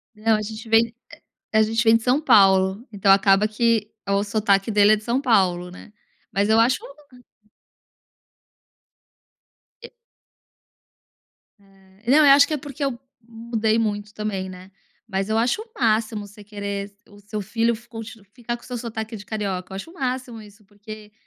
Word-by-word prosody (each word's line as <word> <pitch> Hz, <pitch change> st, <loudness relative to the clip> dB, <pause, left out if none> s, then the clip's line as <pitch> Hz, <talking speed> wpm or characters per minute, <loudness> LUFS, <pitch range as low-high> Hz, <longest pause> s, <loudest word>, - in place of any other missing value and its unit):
Não, 220 Hz, +1 st, +2 dB
a 215 Hz, -, -3 dB
gente 220 Hz, +2 st, -8 dB
vem 225 Hz, +1 st, +3 dB, 0.6 s
a 220 Hz, -, +4 dB
gente 225 Hz, +2 st, 0 dB
vem 225 Hz, 0 st, +5 dB
de 230 Hz, -, -10 dB
São 255 Hz, +5 st, +2 dB
Paulo, 195 Hz, -2 st, +4 dB
então 195 Hz, -1 st, +3 dB
acaba 195 Hz, +1 st, +4 dB
que 220 Hz, -1 st, 0 dB, 0.2 s
o 200 Hz, 0 st, +1 dB
sotaque 200 Hz, -1 st, +1 dB
dele 210 Hz, 0 st, +5 dB
é -, -, +5 dB
de 215 Hz, -, -9 dB
São 240 Hz, +3 st, 0 dB
Paulo, 185 Hz, -9 st, +1 dB
né, 180 Hz, -, -13 dB, 0.4 s
mas 200 Hz, +1 st, +1 dB
eu 220 Hz, +1 st, +4 dB
acho 240 Hz, +3 st, +3 dB
um 275 Hz, -, -13 dB, 2.9 s
E 470 Hz, -, -11 dB, 1.7 s
É. 195 Hz, +3 st, -11 dB
Não 290 Hz, -, +6 dB
eu 310 Hz, -, +6 dB
acho 285 Hz, +1 st, +7 dB
que 310 Hz, -, -3 dB
é -, -, 0 dB
porque 285 Hz, 0 st, -6 dB
eu 265 Hz, -4 st, -2 dB, 0.3 s
mudei 225 Hz, -1 st, -1 dB
muito 210 Hz, -2 st, -2 dB
também, 200 Hz, -3 st, -4 dB
né, 185 Hz, +1 st, -12 dB, 0.4 s
mas 195 Hz, -2 st, -3 dB
eu 220 Hz, +1 st, +1 dB
acho 245 Hz, -, 0 dB
o 455 Hz, -, -18 dB
máximo 220 Hz, -2 st, 0 dB
você 205 Hz, +1 st, -15 dB
querer 200 Hz, -1 st, -6 dB, 0.2 s
o 205 Hz, 0 st, -17 dB
seu 210 Hz, +1 st, -6 dB
filho 225 Hz, +3 st, 0 dB
f 235 Hz, +2 st, -14 dB
conti 225 Hz, -1 st, -9 dB
ficar 240 Hz, -1 st, -5 dB
com 235 Hz, -, -22 dB
o -, -, -14 dB
seu 250 Hz, -, -5 dB
sotaque 225 Hz, -1 st, -6 dB
de 205 Hz, -, -11 dB
carioca, 195 Hz, -4 st, -4 dB
eu -, -, -5 dB
acho 195 Hz, +12 st, -8 dB
o -, -, -17 dB
máximo 255 Hz, -6 st, -4 dB
isso, 210 Hz, 0 st, -17 dB
porque 210 Hz, +1 st, -12 dB
215 Hz, 180 wpm, -22 LUFS, 200-230 Hz, 2.9 s, acho